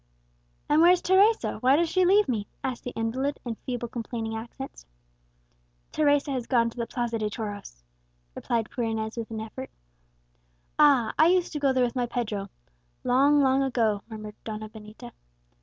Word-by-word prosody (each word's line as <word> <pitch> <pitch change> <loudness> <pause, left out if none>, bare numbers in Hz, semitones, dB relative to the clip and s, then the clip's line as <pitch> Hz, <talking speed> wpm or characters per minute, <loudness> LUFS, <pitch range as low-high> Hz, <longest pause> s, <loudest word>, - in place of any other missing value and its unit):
"And 300 +2 +4
where's 355 +1 +6
Teresa? 400 +5 +3
why 260 +2 +4
does 335 +3 +2
she 370 +2 +2
leave 405 +3 +4
me?" 215 -5 -2 0.2
asked 255 -2 -3
the - - -4
invalid, 260 +6 -2
in 235 - -2
feeble 245 +1 -5
complaining 225 -1 -5
accents. 235 - -8 1.0
"Teresa 290 -1 +2
has 255 -3 -3
gone 235 -3 +2
to - - -18
the 235 -1 -2
Plaza 240 -3 -2
de 215 -1 -1
Toros," 205 - -7 0.5
replied 230 - -2
poor 240 - -3
Inez 220 -1 -2
with 230 -2 -5
an 220 -1 -5
effort. 240 +4 -7 1.1
"Ah! 275 -7 +5
I 315 - +7
used 360 -1 +2
to 300 - -2
go 280 -2 +3
there 260 -1 +2
with 240 - -4
my 245 -1 0
Pedro 215 -5 -3 0.5
long, 280 +3 +4
long 265 0 +3
ago," 230 -6 +1
murmured 215 -1 -8
Donna 215 -1 -6
Benita. 215 0 -11
240 Hz, 170 wpm, -26 LUFS, 220-280 Hz, 1.1 s, I